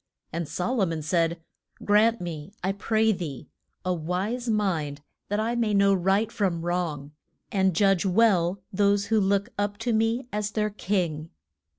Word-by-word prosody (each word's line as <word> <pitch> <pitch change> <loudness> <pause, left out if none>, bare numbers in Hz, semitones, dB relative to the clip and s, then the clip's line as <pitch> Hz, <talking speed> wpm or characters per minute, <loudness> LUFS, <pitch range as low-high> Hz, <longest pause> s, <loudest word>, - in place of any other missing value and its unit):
And 170 -2 -3
So 185 +8 -2
lo 210 -7 +2
mon 165 -2 -3
said, 165 +1 0 0.4
Grant 220 +3 +4
me, 165 -1 -6
I 190 - +1
pray 220 +3 +1
thee 170 -9 -5 0.4
a 185 - +1
wise 190 +9 -2
mind 165 -10 0 0.3
that 205 +1 0
I 225 +2 0
may 225 -3 +1
know 200 0 +5
right 195 +4 +1
from 175 -5 -1
wrong, 165 -5 -2 0.4
and 190 -3 +2
judge 195 -1 +3
well 190 -2 +2
those 200 +1 +2
who 220 0 +2
look 200 +2 +1
up 205 0 -1
to 230 +1 -1
me 225 +3 +1
as 210 0 -1
their 215 -1 0
king. 175 -6 -2
195 Hz, 165 wpm, -26 LUFS, 170-215 Hz, 0.4 s, know